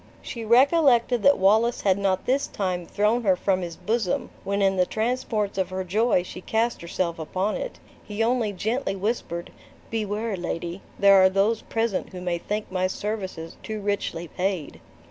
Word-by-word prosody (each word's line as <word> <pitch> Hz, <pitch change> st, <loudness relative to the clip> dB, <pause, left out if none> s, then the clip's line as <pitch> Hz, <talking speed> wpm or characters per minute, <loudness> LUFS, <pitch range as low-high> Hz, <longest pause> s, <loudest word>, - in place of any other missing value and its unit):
She 230 Hz, -, -6 dB
recollected 250 Hz, 0 st, +4 dB
that 280 Hz, +6 st, +5 dB
Wallace 220 Hz, +5 st, +3 dB
had 195 Hz, -1 st, +2 dB
not 190 Hz, -1 st, 0 dB
this 270 Hz, +3 st, +1 dB
time 180 Hz, -3 st, -3 dB
thrown 215 Hz, +4 st, +1 dB
her 190 Hz, -3 st, +4 dB
from 185 Hz, +1 st, 0 dB
his 170 Hz, -2 st, -5 dB
bosom, 220 Hz, -4 st, -1 dB
when 200 Hz, +1 st, -1 dB
in 195 Hz, -1 st, +3 dB
the 180 Hz, -1 st, +3 dB
transports 220 Hz, -3 st, -1 dB
of 190 Hz, -, 0 dB
her 185 Hz, 0 st, -3 dB
joy 205 Hz, +1 st, +2 dB
she 180 Hz, -, -9 dB
cast 230 Hz, +4 st, 0 dB
herself 170 Hz, 0 st, -2 dB
upon 185 Hz, +6 st, -1 dB
it; -, -, -5 dB, 0.3 s
he 210 Hz, +1 st, -2 dB
only 230 Hz, -2 st, +1 dB
gently 220 Hz, +3 st, -2 dB
whispered, 190 Hz, -4 st, -3 dB, 0.4 s
"Beware, 215 Hz, 0 st, -2 dB
lady, 175 Hz, +1 st, -4 dB, 0.2 s
there 200 Hz, -1 st, +7 dB
are 190 Hz, -, +6 dB
those 200 Hz, +4 st, +1 dB
present 225 Hz, -4 st, -2 dB
who 180 Hz, -, -6 dB
may 175 Hz, -1 st, -2 dB
think 210 Hz, +3 st, -4 dB
my 185 Hz, 0 st, +1 dB
services 190 Hz, -5 st, -5 dB
too 220 Hz, -1 st, -5 dB
richly 200 Hz, -4 st, -2 dB
paid." 180 Hz, -, -3 dB
200 Hz, 170 wpm, -25 LUFS, 185-225 Hz, 0.4 s, there